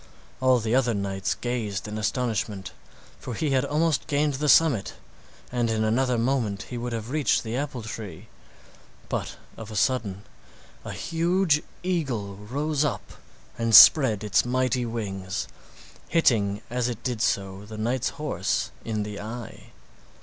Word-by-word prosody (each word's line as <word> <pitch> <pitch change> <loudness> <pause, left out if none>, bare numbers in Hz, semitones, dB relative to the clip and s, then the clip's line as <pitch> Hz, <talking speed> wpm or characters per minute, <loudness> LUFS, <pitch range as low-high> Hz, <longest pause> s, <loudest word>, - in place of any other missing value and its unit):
All 130 -1 +4
the 115 -1 -1
other 125 -3 +2
knights 95 -1 -2
gazed 110 -5 -3
in 105 +1 -4
astonishment, 110 -3 -2 0.5
for 125 - -6
he 150 +5 -1
had 130 -1 +3
almost 155 0 0
gained 145 -1 +1
the 145 +2 -1
summit, 140 -10 +4 0.6
and 120 -2 0
in 110 -1 0
another 125 +3 +1
moment 115 -5 0
he 125 - -7
would 120 +1 -4
have 115 +1 -4
reached 150 -1 +2
the 115 0 -4
apple 135 -3 -3
tree; 105 -5 -7 0.8
but - - -3 0.2
of 110 - -8
a 110 - -8
sudden 105 -4 0 0.6
a - - -6
huge 165 -1 +1 0.2
eagle 135 - -1
rose 140 +9 -1
up 125 -11 -3 0.5
and 115 -1 +3
spread 110 -3 +8
its 105 -3 +3
mighty 125 0 0
wings, 100 -4 -4 0.6
hitting 105 -11 +2
as 125 0 0
it 120 -3 -6
did 120 -4 -2
so 95 -2 -1
the 110 0 -8
knight's 120 +3 0
horse 125 - -1
in 110 -2 -2
the 105 -1 -6
eye. 115 +2 -8
120 Hz, 150 wpm, -26 LUFS, 105-135 Hz, 0.8 s, spread